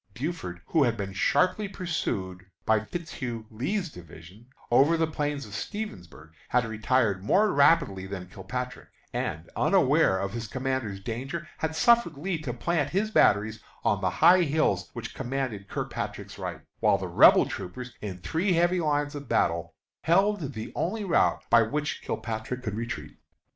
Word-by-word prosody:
Buford, 125 - -4
who 160 - +2
had 120 -3 +1
been 100 -2 -4
sharply 185 - +2
pursued 100 - -3 0.2
by 110 -1 +4
Fitzhugh 120 -3 -5
Lee's 175 - -2
division 90 - -13 0.2
over 145 +7 +5
the 165 - +2
plains 145 -3 -3
of 105 - -11
Stevensburg, 90 - -6 0.2
had 125 -1 +2
retired 110 -3 +1
more 205 - +3
rapidly 100 - +3
than 95 -2 -6
Kilpatrick, 125 +6 -6 0.2
and, 80 +3 -3
unaware 95 - +3
of 100 +1 -3
his 115 -1 -4
comrade's 130 -4 -2
danger, 135 - -5
had 160 0 -2
suffered 235 -6 +4
Lee 175 +2 -2
to 140 -6 -3
plant 145 +4 0
his 205 +6 0
batteries 105 - +3 0.2
on 100 - +1
the 95 - +2
high 180 - +6
hills 155 -1 +1
which 115 -2 -6
commanded 125 -6 -3
Kilpatrick's - - -5
right, - - -5 0.2
while - - +4
the - - -4
Rebel - - +7
troopers, 125 +7 -7
in 100 -4 -5
three 175 - 0
heavy 175 +2 +3
lines 145 -1 0
of 145 -1 -8
battle, - - 0 0.3
held 175 -3 +2
the 110 0 -6
only 210 +5 -2
route 185 - +2
by 115 0 +7
which 145 +7 -2
Kilpatrick 115 +3 -4
could 110 - -3
retreat. 115 +2 -5
130 Hz, 155 wpm, -27 LUFS, 105-165 Hz, 0.3 s, Rebel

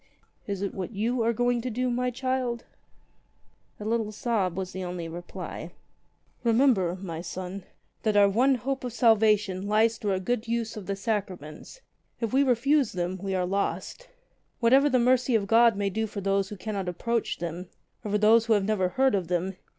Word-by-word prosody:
"Is 200 -1 -3
it 200 - -2
what 190 +3 -5
you 230 +4 0
are 230 +1 +2
going 245 +1 +1
to 250 - -3
do, 250 +2 -1
my 250 +1 0
child 255 -1 -2 0.6
?" - - -40
A 210 - -7
little 220 -1 0
sob 205 -5 -1
was 185 -1 -3
the 185 - -5
only 175 -2 -5
reply. 175 +2 -7 0.7
"Remember, 230 -7 +3
my 170 -4 -5
son, 185 +2 -6 0.4
that 215 -2 +1
our 200 -1 +7
one 250 +7 +3
hope 265 +3 -3
of 245 -2 -4
salvation 210 -5 +3
lies 220 +2 +2
through 205 -2 0
a 185 - 0
good 235 +4 -2
use 230 -1 -2
of 210 -4 -8
the 200 - -1
sacraments. 195 - -5 0.4
If 230 0 -2
we 270 - +4
refuse 275 +1 +2
them 180 +1 -3
we 195 -1 -2
are 180 -1 0
lost. 200 - -3 0.5
Whatever 265 +5 +5
the 255 - +3
mercy 255 0 +3
of 210 -3 +2
God 230 +1 +5
may 200 -1 -1
do 220 +3 -1
for 210 - -6
those 195 0 0
who 210 - -7
cannot 195 -2 -3
approach 230 +6 -2
them, 175 +1 -5 0.3
or 210 - -4
for 210 - +2
those 220 +2 +5
who 225 - +4
have 205 -2 +2
never 195 -3 +1
heard 265 +7 +2
of 190 -4 0
them. 180 +2 -1
215 Hz, 195 wpm, -27 LUFS, 190-240 Hz, 0.7 s, our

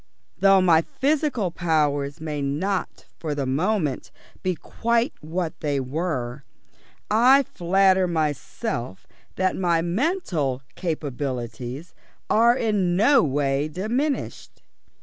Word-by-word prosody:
Though 195 -1 +6
my 165 -3 +5
physical 275 - 0
powers 150 -4 0
may 155 -2 -4
not 170 +8 -2
for 155 -3 -3
the 140 -2 -2
moment 155 +2 -1 0.3
be 185 -1 -1
quite 235 - -1
what 165 +2 -4
they 145 -2 -1
were, 135 -2 -3 0.7
I 255 +6 +6
flatter 190 -2 +2
myself 150 - -3 0.3
that 185 0 +1
my 170 -3 +1
mental 175 - -1
capabilities 135 -3 -4 0.4
are 235 +3 +5
in 200 -7 +1
no 245 +7 +5
way 140 -1 0
diminished." 235 - -3
170 Hz, 105 wpm, -24 LUFS, 145-205 Hz, 0.7 s, Though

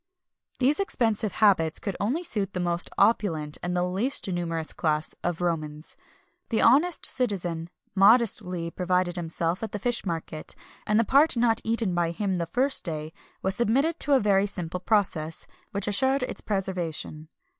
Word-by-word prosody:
[XXI 370 +1 -42
283] 255 - +4
These 295 +5 +3
expensive 225 - 0
habits 170 -7 +3
could 200 -3 -4
only 260 - -1
suit 205 - -3
the 180 - -3
most 175 0 -1
opulent 160 -10 +1
and 175 0 -2 0.2
least 235 +7 -1
numerous 165 -3 -3
class 155 -1 0
of 175 -1 -2
Romans. 155 -3 -3 0.5
The 225 - +2
honest 300 +8 +4
citizen 175 -9 -1 0.2
modestly 195 -5 +3
provided 180 0 0
himself 170 0 -2
at 225 - -5
the - - -1
fish 240 +3 -1
market, 165 -3 -5 0.3
and 210 +1 +3
the - - +4
part 275 +4 +4
not 230 -1 +2
eaten 225 -4 0
by 175 -1 +1
him 190 +3 -2
the 170 -2 -2
first 265 - +1
day 155 -2 -5 0.3
was 190 0 +2
submitted 275 +10 +1
to 290 - +2
a 270 - +6
very 200 -2 +2
simple 180 -3 -4
process, 180 -6 0 0.3
which 200 0 -2
assured 265 +6 +3
its - - -3
preservation. 180 -6 -2
195 Hz, 165 wpm, -26 LUFS, 170-230 Hz, 0.5 s, a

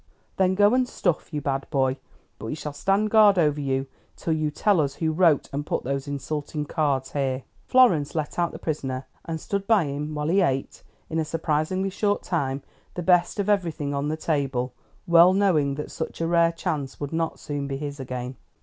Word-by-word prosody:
"Then 190 0 +3
go 205 +3 +5
and 255 -1 +2
stuff, 175 -4 -1
you 150 -2 -3
bad 135 -1 -2
boy, 130 -3 +1 0.4
but 110 - -6
we 115 - -3
shall 150 -2 -6
stand 195 +7 +1
guard 210 -3 +6
over 150 -3 +2
you 135 -1 -1 0.3
till 165 - -1
you 155 -1 0
tell 180 +4 +2
us 140 -1 -2
who 160 -1 0
wrote 165 -3 +3
and 145 +1 -2
put - - -2
those 135 +2 -3
insulting 150 +1 -3
cards 140 -3 0
here." 135 -2 -1 0.2
Florence 175 - +4
let 155 +1 -2
out 170 -1 +1
the - - -8
prisoner, 135 -4 -3 0.2
and 165 -1 -4
stood 200 +4 -3
by 215 -5 +5
him 150 +2 -4
while 150 +1 -1
he 195 +3 +4
ate, 135 -6 -1 0.3
in 160 - -2
a - - +1
surprisingly 165 +4 -1
short 205 +1 0
time, 140 -6 -2 0.3
the 175 - -3
best 180 +3 +3
of 200 - 0
everything 165 -8 0
on 140 +1 -1
the 155 +1 -2
table, 135 -6 -1 0.3
well 170 +2 +7
knowing 165 -8 +2
that 150 - -6
such 160 - -5
a 165 - 0
rare 170 0 +3
chance 145 -5 -4
would 145 +1 -5
not 165 0 -1
soon 145 -1 -4
be 135 -1 -3
his 145 0 -5
again. 125 0 -5
155 Hz, 205 wpm, -25 LUFS, 140-175 Hz, 0.4 s, well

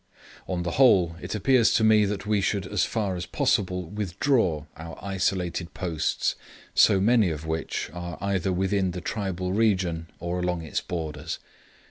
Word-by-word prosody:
On 90 -2 -2
the 85 - -2
whole 90 -10 +5
it 90 +4 -4
appears 115 +2 +4
to 110 - +3
me 110 -1 +5
that 100 0 -3
we 105 -1 +1
should 100 -1 0
as 100 -3 0
far 105 -5 -1
as 90 0 -5
possible 90 -3 0
withdraw 100 - 0
our 80 +1 -9
isolated 95 -3 -2
posts, 85 -5 -1 0.4
so 100 -3 +5
many 110 -1 +4
of 80 -1 -5
which, 80 -2 -3
are 85 -1 -6
either 95 -2 0
within 95 0 0
the 90 - -5
tribal 95 -3 -3
country 95 -6 +1
or 85 +1 -3
along 90 -2 -1
its 80 - -2
borders. 75 -3 -4
95 Hz, 160 wpm, -26 LUFS, 85-100 Hz, 0.4 s, whole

